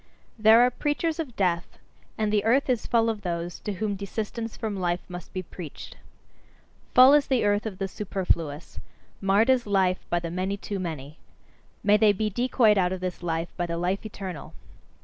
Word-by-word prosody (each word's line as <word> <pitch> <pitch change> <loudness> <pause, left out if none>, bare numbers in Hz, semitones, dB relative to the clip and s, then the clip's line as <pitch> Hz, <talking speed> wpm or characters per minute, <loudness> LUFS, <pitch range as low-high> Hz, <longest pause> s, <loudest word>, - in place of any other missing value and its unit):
There 220 +2 +7
are 250 +1 +4
preachers 305 +5 -1
of 270 -8 -4
death: 175 -3 -1 0.4
and 215 -1 0
the 205 -1 +2
earth 255 +4 +3
is 245 - -1
full 230 -1 +3
of 220 -2 -2
those 175 -1 -4
to 210 - -4
whom 205 +1 -2
desistance 220 +3 -5
from 220 -3 -3
life 180 -2 -1
must 180 -1 -9
be 185 - -4
preached. 170 -2 -9 1.0
Full 255 +2 +9
is 295 -1 +4
the 255 -5 +1
earth 205 +1 +1
of 195 -4 -6
the 195 0 -2
superfluous; 175 -6 -3 0.4
marred 200 +6 +4
is 250 -4 +1
life 190 -2 +2
by 175 - +1
the 170 -1 -5
many 185 +3 -2
too 200 0 -5
many. 155 -4 -6 0.6
May 205 +1 +5
they 210 -1 +5
be 215 +2 -2
decoyed 235 -2 +3
out 180 -1 +2
of 185 - -3
this 180 0 -4
life 165 -1 -2
by 175 -1 -1
the 170 0 -3
"life 180 +3 -1
eternal"! 195 -6 -7
200 Hz, 190 wpm, -26 LUFS, 180-225 Hz, 1.0 s, Full